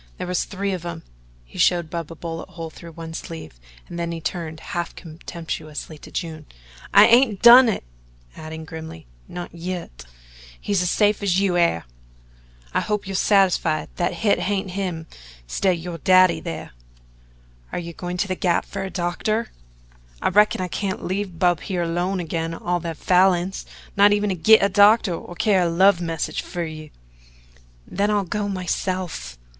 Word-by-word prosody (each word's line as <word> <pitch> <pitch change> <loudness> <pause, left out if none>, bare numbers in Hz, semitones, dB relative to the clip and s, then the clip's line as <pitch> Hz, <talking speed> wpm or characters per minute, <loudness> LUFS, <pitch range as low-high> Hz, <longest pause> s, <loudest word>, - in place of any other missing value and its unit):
There - - -4
was 180 0 -1
three 200 0 -3
of 180 -2 -4
'em." 170 -1 -6 0.4
He - - -12
showed 170 -3 +2
Bub 170 -2 -4
a - - -8
bullet 165 +2 -6
hole 165 -3 -7
through 170 +1 -12
one 165 0 -8
sleeve 160 - -8 0.3
and 175 - -7
then 170 0 -2
he 165 - -4
turned 160 -1 -4
half 175 -1 -3
contemptuously 160 -2 -7
to - - -12
June: 160 -3 -5 0.4
"I 205 - +8
hain't 230 -3 +4
done 240 +1 +10
it" 215 - -2 0.5
adding 160 0 -8
grimly 160 - -9 0.2
"not 175 -2 -7
yit. 170 - -6 0.5
He's 200 -3 0
as 180 - +1
safe 210 +1 +2
as 190 -2 +2
you 195 -3 +1
air. 170 - +2 0.9
I - - +2
hope 210 -1 -2
you're 195 - -5
satisfied 185 -6 +2
that 175 - 0
hit 210 -2 +2
hain't 190 -1 -1
him 180 -4 -3 0.4
'stid 190 - 0
o' - - +5
yo' 170 0 -5
daddy 185 0 +4
thar." 80 - -6 1.0
"Are - - -3
you 170 -1 -5
going 180 +1 -5
to 200 - 0
the 185 - -1
Gap 180 -2 0
for - - -6
a 190 - -4
doctor?" 195 +6 -2 0.7
"I - - +1
reckon 210 0 +3
I 185 - -1
can't 190 +1 -3
leave 190 -1 -3
Bub 175 -1 +3
here 180 -3 -2
alone 175 +3 -1
agin 165 -1 -3
all 175 +1 -1
the 165 -1 -5
Falins 180 +2 +2 0.3
not 205 +1 +6
even 205 0 +1
to 190 - 0
git 220 +5 +6
a - - +5
doctor 205 0 +5
or 175 +1 -7
to - - -20
carry 195 -4 +4
a 170 - +1
love 185 +2 +4
message 165 -2 -2
fer 175 -1 -5
you." 155 -1 -8 1.0
"Then 200 +2 -1
I'll 205 -1 +2
go 205 +3 -3
myself." 185 - -3
175 Hz, 180 wpm, -23 LUFS, 165-195 Hz, 1.0 s, done